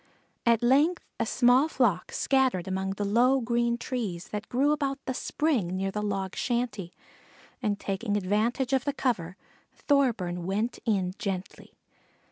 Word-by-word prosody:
At 235 Hz, 0 st, +4 dB
length 290 Hz, +8 st, +3 dB
a -, -, 0 dB
small 250 Hz, +4 st, +4 dB
flock 230 Hz, -, +1 dB
scattered 260 Hz, -9 st, +1 dB
among 190 Hz, 0 st, -2 dB
the 205 Hz, +1 st, -3 dB
low 245 Hz, +6 st, +4 dB
green 235 Hz, 0 st, 0 dB
trees 215 Hz, -9 st, -4 dB
that 210 Hz, 0 st, -5 dB
grew 275 Hz, +4 st, +2 dB
about 280 Hz, -2 st, 0 dB
the 260 Hz, -, -2 dB
spring, 245 Hz, -, -1 dB
near 195 Hz, 0 st, -1 dB
the 210 Hz, -, -3 dB
log 195 Hz, -2 st, -2 dB
shanty, 235 Hz, -7 st, -2 dB, 0.7 s
and 210 Hz, -4 st, -1 dB
taking 205 Hz, +2 st, -2 dB
advantage 220 Hz, +7 st, 0 dB
of 265 Hz, -2 st, +2 dB
the 285 Hz, -, -1 dB
cover, 190 Hz, -10 st, -1 dB, 0.4 s
Thorburn 210 Hz, -12 st, 0 dB
went 210 Hz, +5 st, -1 dB
in 190 Hz, -5 st, +1 dB
gently. 195 Hz, -4 st, -5 dB
230 Hz, 145 wpm, -28 LUFS, 195-255 Hz, 0.7 s, At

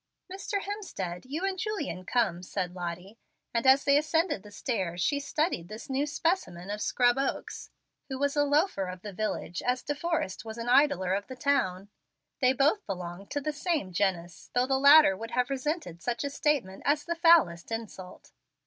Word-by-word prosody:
"Mr. 395 Hz, +1 st, -3 dB
Hemstead, 225 Hz, -, -5 dB
you 320 Hz, +7 st, -2 dB
and 385 Hz, -1 st, -2 dB
Julian 335 Hz, -, -3 dB
come," 205 Hz, -8 st, +1 dB
said 180 Hz, 0 st, -4 dB
Lottie, 180 Hz, +4 st, -6 dB, 0.3 s
and 235 Hz, +2 st, +1 dB
as 265 Hz, +1 st, +6 dB
they 280 Hz, 0 st, +5 dB
ascended 315 Hz, -, 0 dB
the 210 Hz, -, -13 dB
stairs 195 Hz, -5 st, -3 dB
she 285 Hz, +11 st, +1 dB
studied 285 Hz, -, -1 dB
this 215 Hz, +5 st, -8 dB
new 275 Hz, +3 st, 0 dB
specimen 295 Hz, -, -1 dB
of 210 Hz, 0 st, -4 dB
Scrub 245 Hz, +2 st, +2 dB
Oaks, 275 Hz, -, -3 dB, 0.4 s
who 265 Hz, -, -3 dB
was 285 Hz, +1 st, 0 dB
a 290 Hz, -, +4 dB
loafer 290 Hz, -, +1 dB
of 180 Hz, 0 st, -8 dB
the 205 Hz, -2 st, -7 dB
village 180 Hz, -4 st, -3 dB
as 250 Hz, +1 st, -1 dB
De 290 Hz, -, -2 dB
Forrest 295 Hz, -, -2 dB
was 220 Hz, 0 st, -7 dB
an 230 Hz, +1 st, -5 dB
idler 255 Hz, -9 st, +4 dB
of 200 Hz, +1 st, -2 dB
the 260 Hz, -, -7 dB
town. 205 Hz, -9 st, 0 dB, 0.5 s
They 255 Hz, -2 st, +4 dB
both 290 Hz, -, +2 dB
belonged 180 Hz, +1 st, -6 dB
to 290 Hz, -, -2 dB
the 305 Hz, +2 st, -2 dB
same 295 Hz, -, -2 dB
genus, 175 Hz, -3 st, -1 dB
though 245 Hz, +1 st, +3 dB
the 265 Hz, 0 st, +1 dB
latter 285 Hz, -6 st, +8 dB
would 225 Hz, +4 st, -7 dB
have 250 Hz, +1 st, +1 dB
resented 275 Hz, -, -3 dB
such 240 Hz, +5 st, -2 dB
a 285 Hz, -, -3 dB
statement 275 Hz, -11 st, 0 dB
as 295 Hz, +1 st, +2 dB
the 340 Hz, -, -2 dB
foulest 330 Hz, -, +4 dB
insult. 215 Hz, -5 st, -7 dB
255 Hz, 185 wpm, -29 LUFS, 190-295 Hz, 0.5 s, latter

